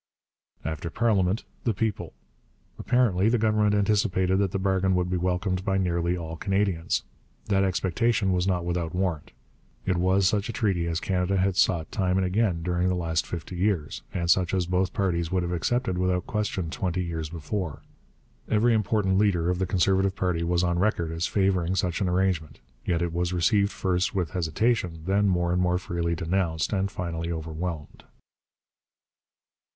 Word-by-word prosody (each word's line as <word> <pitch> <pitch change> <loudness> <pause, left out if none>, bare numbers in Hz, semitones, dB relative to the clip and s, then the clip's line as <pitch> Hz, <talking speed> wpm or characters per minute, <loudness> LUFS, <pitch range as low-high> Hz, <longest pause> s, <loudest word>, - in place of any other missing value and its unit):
After 80 +2 -3
parliament, 105 -1 +1 0.2
the 115 -4 0
people. 110 +2 -2 0.7
Apparently 110 -6 +2
the 120 - +2
Government 105 -1 +2
anticipated 100 -3 +2
that 100 -1 +2
the 95 - -2
bargain 95 -1 +1
would 90 0 0
be - - +1
welcomed 90 +1 -1
by 95 -1 0
nearly 85 -1 0
all 80 -1 -6
Canadians. 95 -3 0 0.5
That 95 -1 +3
expectation 95 +3 +1
was 90 +1 0
not 90 -3 0
without 85 -1 -2
warrant. 90 -5 -2 0.5
It 95 -2 +1
was 95 +2 +2
such 100 +1 0
a - - -3
treaty 95 -7 0
as 85 0 -1
Canada 95 +1 0
had 95 0 +1
sought 85 -4 +2
time 95 -2 0
and 95 - +2
again 90 -3 0
during 90 +1 0
the 90 - +1
last 80 -2 -1
fifty 85 +1 -6
years, 85 - -1
and 85 -2 -2
such 90 0 +3
as 90 -2 +1
both 90 +2 0
parties 85 -4 -1
would 90 -1 +1
have 85 - -3
accepted 95 +3 0
without 90 -1 0
question 105 -6 -2
twenty 90 0 -2
years 80 -3 -4
before. 85 0 -4 0.7
Every 115 +2 +3
important 105 -3 +1
leader 90 -5 +2
of 90 - -2
the 95 - 0
Conservative 95 +1 +2
party 90 -3 0
was 85 +1 +1
on 85 -1 +1
record 90 -5 0
as 85 +1 -1
favouring 95 -3 +1
such 90 -1 -1
an 95 - +1
arrangement. 90 -4 0 0.3
Yet 85 -1 +1
it 85 -1 -2
was 90 +1 -1
received 100 +4 +2
first 95 +2 -1
with 90 -5 -1
hesitation, 90 0 0
then 100 +2 +2
more 90 -2 +1
and 90 - +1
more 90 0 +2
freely 85 -2 -2
denounced, 85 0 -1
and 100 0 0
finally 85 -2 -4
overwhelmed. 80 -1 -5
90 Hz, 170 wpm, -26 LUFS, 85-95 Hz, 0.7 s, That